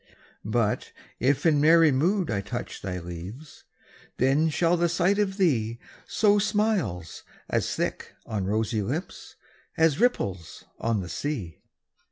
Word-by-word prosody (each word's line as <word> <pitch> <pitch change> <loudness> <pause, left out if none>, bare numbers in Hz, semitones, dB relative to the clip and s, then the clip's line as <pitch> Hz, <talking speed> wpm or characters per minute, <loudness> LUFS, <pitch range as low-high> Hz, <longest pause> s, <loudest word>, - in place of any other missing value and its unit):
But 110 0 -1 0.3
if 140 +3 +1
in 150 -3 +4
merry 160 0 +6
mood 170 - +1
I 100 -2 0
touch 120 +5 -6
Thy 90 -2 -4
leaves, 90 - -9 0.5
then 140 +5 +3
shall 170 +2 +2
the 170 0 +1
sight 180 +4 +2
of 195 -2 0
thee 120 - +1 0.3
Sow 205 -1 +3
smiles 200 - -1 0.3
as - - -1
thick - - -3
on 105 -4 -3
rosy 110 +1 0
lips 145 - -5 0.4
As 160 -1 +3
ripples 95 - -1 0.2
on 115 -3 0
the 90 - -6
sea. 95 - -4
140 Hz, 135 wpm, -26 LUFS, 105-170 Hz, 0.5 s, merry